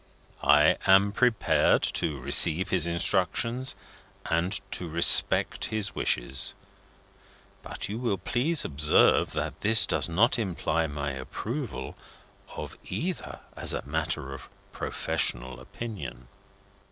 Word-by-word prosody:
I 75 Hz, +1 st, +4 dB
am 95 Hz, +1 st, +5 dB
prepared 115 Hz, 0 st, +2 dB
to 75 Hz, -4 st, 0 dB
receive 80 Hz, +6 st, +5 dB
his 85 Hz, -3 st, +1 dB
instructions, 95 Hz, +8 st, 0 dB, 0.5 s
and 85 Hz, +4 st, 0 dB
to 90 Hz, -, -3 dB
respect 85 Hz, +2 st, +4 dB
his 105 Hz, -4 st, -3 dB
wishes; 65 Hz, +2 st, -1 dB, 1.1 s
but -, -, -4 dB
you 105 Hz, +3 st, -6 dB
will 115 Hz, -6 st, -1 dB
please 130 Hz, -, -1 dB
observe 75 Hz, +1 st, +2 dB
that -, -, -5 dB
this 110 Hz, +2 st, +6 dB
does -, -, -1 dB
not 110 Hz, +9 st, +2 dB
imply 80 Hz, -5 st, -2 dB
my 70 Hz, -1 st, -4 dB
approval 115 Hz, -, -6 dB, 0.6 s
of -, -, -8 dB
either 180 Hz, +3 st, -5 dB
as -, -, +1 dB
a -, -, -5 dB
matter 75 Hz, -2 st, -3 dB
of 70 Hz, -, -11 dB, 0.2 s
professional 65 Hz, +1 st, -2 dB
opinion." 105 Hz, -, -9 dB
90 Hz, 115 wpm, -26 LUFS, 75-110 Hz, 1.1 s, this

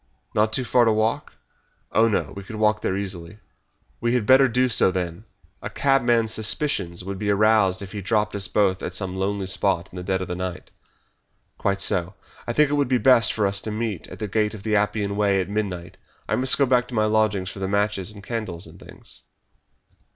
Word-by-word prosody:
"Not 110 Hz, +1 st, +2 dB
too 130 Hz, +3 st, -1 dB
far 120 Hz, 0 st, +3 dB
to 115 Hz, -, +4 dB
walk?" 110 Hz, +1 st, -1 dB, 0.6 s
"Oh, 115 Hz, -, +4 dB
no, 110 Hz, -, -1 dB
we 100 Hz, -, -6 dB
could 110 Hz, +3 st, -9 dB
walk 105 Hz, 0 st, +1 dB
there 95 Hz, -, -1 dB
easily." 95 Hz, -1 st, -6 dB, 0.6 s
"We 120 Hz, +1 st, 0 dB
had 120 Hz, -4 st, 0 dB
better 135 Hz, +3 st, +6 dB
do 125 Hz, +1 st, +2 dB
so, 115 Hz, -5 st, +4 dB
then. 90 Hz, +1 st, -4 dB, 0.4 s
A -, -, -5 dB
cabman's 120 Hz, -5 st, +2 dB
suspicions 105 Hz, -, -1 dB
would 95 Hz, 0 st, -6 dB
be 105 Hz, 0 st, -2 dB
aroused 100 Hz, -2 st, +3 dB
if 95 Hz, -, -9 dB
he 105 Hz, -, -5 dB
dropped 105 Hz, +1 st, 0 dB
us 100 Hz, -2 st, -1 dB
both 95 Hz, 0 st, +1 dB
at 90 Hz, -, -4 dB
some 95 Hz, -1 st, -3 dB
lonely 95 Hz, +1 st, -2 dB
spot 95 Hz, -1 st, 0 dB
in -, -, -10 dB
the 90 Hz, -, -5 dB
dead 95 Hz, 0 st, -1 dB
of 95 Hz, -, -4 dB
the 90 Hz, -, -4 dB
night." 90 Hz, -1 st, -6 dB, 0.9 s
"Quite 100 Hz, 0 st, 0 dB
so. 90 Hz, +1 st, 0 dB, 0.3 s
I 120 Hz, -, -1 dB
think 150 Hz, +2 st, +3 dB
it 145 Hz, -, +1 dB
would 145 Hz, -, +2 dB
be 125 Hz, 0 st, +2 dB
best 120 Hz, -3 st, +5 dB
for 105 Hz, -, 0 dB
us 100 Hz, 0 st, +1 dB
to -, -, -5 dB
meet 110 Hz, -3 st, -3 dB
at -, -, -10 dB
the 105 Hz, -, -4 dB
Gate 105 Hz, +2 st, 0 dB
of 100 Hz, -, -11 dB
the 110 Hz, 0 st, 0 dB
Appian 100 Hz, -1 st, 0 dB
Way 100 Hz, -2 st, +2 dB
at 95 Hz, -, -2 dB
midnight. 95 Hz, -5 st, -4 dB, 0.3 s
I -, -, +1 dB
must 130 Hz, +1 st, +2 dB
go 140 Hz, -, +4 dB
back 125 Hz, -1 st, +2 dB
to 125 Hz, -, -7 dB
my 110 Hz, -1 st, +2 dB
lodgings 105 Hz, -3 st, +1 dB
for -, -, -10 dB
the 95 Hz, -, -2 dB
matches 100 Hz, -1 st, 0 dB
and 105 Hz, -2 st, -11 dB
candles 95 Hz, -7 st, -4 dB
and 85 Hz, +2 st, -14 dB
things." -, -, -12 dB
105 Hz, 220 wpm, -23 LUFS, 95-110 Hz, 0.9 s, better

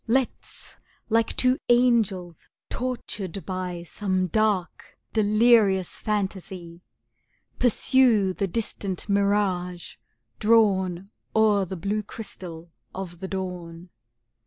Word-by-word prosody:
Let's, 255 Hz, +2 st, -2 dB, 0.3 s
like 225 Hz, 0 st, +2 dB
two 255 Hz, +1 st, +3 dB
angels 225 Hz, -8 st, +2 dB, 0.2 s
tortured 210 Hz, -7 st, -4 dB
by 180 Hz, -2 st, -4 dB
Some 185 Hz, +1 st, -1 dB
dark, 200 Hz, -1 st, -1 dB, 0.2 s
delirious 215 Hz, -3 st, +4 dB
phantasy, 190 Hz, -4 st, -3 dB, 0.8 s
Pursue 235 Hz, -5 st, +3 dB
the 195 Hz, -, -1 dB
distant 195 Hz, -2 st, -3 dB
mirage 200 Hz, -3 st, 0 dB, 0.4 s
drawn 195 Hz, -4 st, +2 dB, 0.2 s
O'er 210 Hz, -3 st, +4 dB
the 185 Hz, +1 st, -6 dB
blue 205 Hz, +5 st, -1 dB
crystal 175 Hz, -6 st, -8 dB, 0.2 s
of 180 Hz, -3 st, -6 dB
the 190 Hz, -, -5 dB
dawn! 180 Hz, -3 st, -6 dB
195 Hz, 90 wpm, -25 LUFS, 180-220 Hz, 0.8 s, delirious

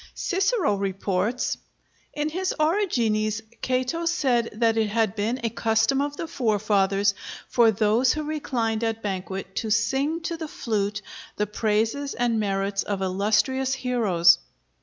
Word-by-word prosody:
Cicero 385 Hz, -, +1 dB
reports: 195 Hz, +4 st, -1 dB, 0.6 s
"In 300 Hz, +1 st, -1 dB
his 370 Hz, +4 st, -2 dB
'Origines' 235 Hz, -, +1 dB, 0.2 s
Cato 255 Hz, +6 st, -1 dB
said 260 Hz, -9 st, +1 dB
that 225 Hz, +1 st, +2 dB
it 220 Hz, -1 st, +2 dB
had 220 Hz, -1 st, 0 dB
been 225 Hz, +5 st, -1 dB
a 230 Hz, -, 0 dB
custom 225 Hz, +4 st, +2 dB
of 290 Hz, 0 st, -3 dB
the -, -, -3 dB
forefathers, 205 Hz, -6 st, +1 dB, 0.3 s
for 235 Hz, -2 st, +4 dB
those 220 Hz, +4 st, +3 dB
who 305 Hz, -, -3 dB
reclined 240 Hz, -7 st, -2 dB
at 225 Hz, 0 st, -2 dB
banquet 190 Hz, -1 st, -4 dB
to 220 Hz, -, -1 dB
sing 280 Hz, +9 st, +1 dB
to 335 Hz, 0 st, -3 dB
the 320 Hz, -1 st, -5 dB
flute 210 Hz, -6 st, -2 dB, 0.3 s
the 210 Hz, -, 0 dB
praises 220 Hz, +6 st, -1 dB
and 240 Hz, -2 st, +1 dB
merits 195 Hz, -1 st, 0 dB
of 195 Hz, -2 st, -3 dB
illustrious 210 Hz, +8 st, +1 dB
heroes." 200 Hz, -10 st, +3 dB
225 Hz, 140 wpm, -25 LUFS, 205-270 Hz, 0.6 s, for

